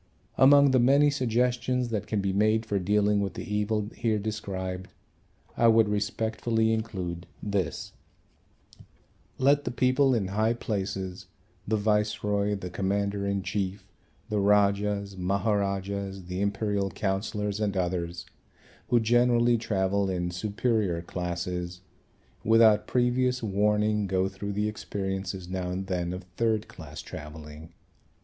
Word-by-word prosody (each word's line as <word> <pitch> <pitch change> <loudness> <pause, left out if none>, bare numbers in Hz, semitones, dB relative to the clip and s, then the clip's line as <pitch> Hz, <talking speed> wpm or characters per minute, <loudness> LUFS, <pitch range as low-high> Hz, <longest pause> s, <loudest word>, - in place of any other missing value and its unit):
Among 140 +1 +6
the 130 - +4
many 140 +4 +5
suggestions 125 -1 0
that 110 -4 -3
can 105 -2 0
be 95 -1 -1
made 110 +3 +2
for 100 -2 0
dealing 105 +2 +2
with 100 -2 -3
the - - -5
evil 105 0 -1
here 115 -2 0
described, 95 -3 -4 0.7
I 115 - +4
would 115 -1 +5
respectfully 110 +2 0
include 90 -6 -4 0.2
this: 100 -4 -2 1.4
let 140 +2 +3
the - - -2
people 130 +2 +3
in 100 -5 -1
high 110 +4 +1
places, 95 -4 -4 0.4
the 110 +1 +1
Viceroy, 105 -1 +1
the 90 -3 -6
Commander 100 +2 -1
in 100 -1 -1
Chief, 95 0 -3 0.4
the 105 -2 -1
Rajas, 100 0 +2
Maharajas, 100 0 -1
the 90 +2 -4
Imperial 100 -1 0
Councillors 100 +2 -2
and 100 -2 -1
others, 85 -1 -2 0.6
who 120 - +4
generally 120 +1 +3
travel 100 -2 0
in 90 -1 -2
superior 100 -2 -1
classes, 90 0 -4 0.6
without 110 -1 +5
previous 125 0 +1
warning, 105 0 +1
go 95 0 +1
through 100 +1 -5
the 105 +1 0
experiences 95 -3 -4
now 90 -1 -3
and 95 +2 -3
then 90 -2 -2
of 90 +1 -6
third 110 -2 +1
class 75 -3 -10
travelling. 75 +1 -9
100 Hz, 130 wpm, -27 LUFS, 95-110 Hz, 1.4 s, Among